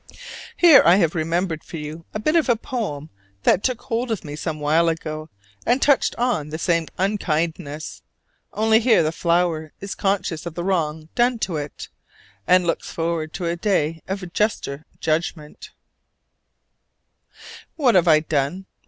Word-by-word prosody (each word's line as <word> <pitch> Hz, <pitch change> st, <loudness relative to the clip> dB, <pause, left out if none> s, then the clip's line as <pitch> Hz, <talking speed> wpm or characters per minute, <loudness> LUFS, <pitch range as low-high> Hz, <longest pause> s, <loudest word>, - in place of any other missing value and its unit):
Here 330 Hz, -6 st, +8 dB
I 170 Hz, -, +6 dB
have 170 Hz, -5 st, +2 dB
remembered 165 Hz, 0 st, -1 dB
for 165 Hz, -, -8 dB
you 155 Hz, +2 st, -7 dB
a -, -, -3 dB
bit 305 Hz, +9 st, +1 dB
of 320 Hz, -5 st, +3 dB
a 240 Hz, -, +5 dB
poem 210 Hz, -, -5 dB, 0.3 s
that 185 Hz, -, +4 dB
took 255 Hz, -3 st, -1 dB
hold 240 Hz, 0 st, -2 dB
of 220 Hz, -7 st, -3 dB
me 145 Hz, -1 st, -6 dB
some 155 Hz, 0 st, -4 dB
while 160 Hz, +3 st, +3 dB
ago 155 Hz, -1 st, -4 dB, 0.3 s
and 245 Hz, +3 st, +2 dB
touched 285 Hz, -1 st, +3 dB
on 235 Hz, -12 st, -1 dB
the 155 Hz, -, -4 dB
same 170 Hz, -1 st, 0 dB
unkindness: 165 Hz, -5 st, -2 dB, 0.5 s
only 220 Hz, +1 st, +3 dB
here 230 Hz, -6 st, +4 dB
the 155 Hz, -, 0 dB
flower 170 Hz, -2 st, 0 dB
is 200 Hz, 0 st, -5 dB
conscious 190 Hz, -5 st, -1 dB
of 165 Hz, -, -7 dB
the 175 Hz, -, -3 dB
wrong 160 Hz, -4 st, -1 dB
done 240 Hz, 0 st, +2 dB
to 170 Hz, -5 st, -4 dB
it, 145 Hz, -1 st, -6 dB, 0.6 s
and 180 Hz, -1 st, +5 dB
looks 165 Hz, -, -2 dB
forward 165 Hz, -1 st, -2 dB
to 175 Hz, -, -4 dB
a 170 Hz, 0 st, 0 dB
day 165 Hz, -4 st, 0 dB
of 190 Hz, -2 st, -5 dB
juster 160 Hz, -9 st, -1 dB
judgment: 155 Hz, -1 st, -3 dB, 2.1 s
"What 265 Hz, -7 st, +3 dB
have 180 Hz, -2 st, +4 dB
I 155 Hz, -2 st, +6 dB
done? 155 Hz, +4 st, -1 dB
170 Hz, 160 wpm, -22 LUFS, 155-205 Hz, 2.1 s, Here